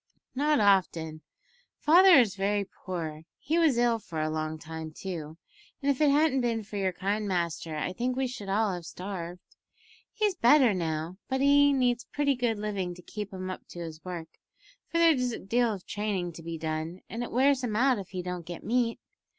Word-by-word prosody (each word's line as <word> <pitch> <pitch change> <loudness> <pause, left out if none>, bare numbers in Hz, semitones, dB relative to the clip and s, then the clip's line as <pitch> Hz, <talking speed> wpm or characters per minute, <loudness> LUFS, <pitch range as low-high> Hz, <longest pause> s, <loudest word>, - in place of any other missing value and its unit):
"Not 295 +2 +2
often. 170 -6 +2 0.6
Father 360 +4 +7
is 235 -7 +5
very 200 +1 0
poor. 160 -5 -6
He 325 +4 0
was 310 -7 +4
ill 240 -1 +3
for 165 -6 -6
a 155 0 0
long 155 0 -2
time, 160 0 -7
too, 160 -2 -6 0.4
and 280 0 +2
if 275 - -3
it 300 - +5
hadn't 285 -2 +3
been 230 -2 0
for 205 0 -7
your 190 -1 +1
kind 200 +3 -2
master 170 -3 -2
I 150 - -2
think 250 +4 -1
we 265 0 0
should 245 -6 -6
all 205 0 +1
have 175 -1 -5
starved. 180 0 -6 0.7
He's 425 -2 +1
better 260 - +5
now, 165 0 -3
but 265 0 0
he 285 +1 +5
needs 250 -3 +1
pretty 290 -1 +1
good 240 -3 0
living 200 -4 -3
to 180 - -14
keep 210 +2 -6
him 185 -1 -5
up - - -9
to 175 - -10
his 160 -1 -8
work 175 -3 -7 0.5
for 335 - -2
there's 285 -8 +4
a - - -3
deal 235 +3 +1
of 195 -4 -6
training 200 -4 -2
to 165 - -10
be 165 0 -5
done, 160 +3 -4
and 230 - -5
it 240 - -4
wears 265 +1 +3
him 225 -4 -2
out 255 0 +3
if 195 - -8
he 185 -1 -5
don't 180 -1 -4
get 170 0 -8
meat. 230 +1 0
200 Hz, 200 wpm, -28 LUFS, 175-250 Hz, 0.7 s, Father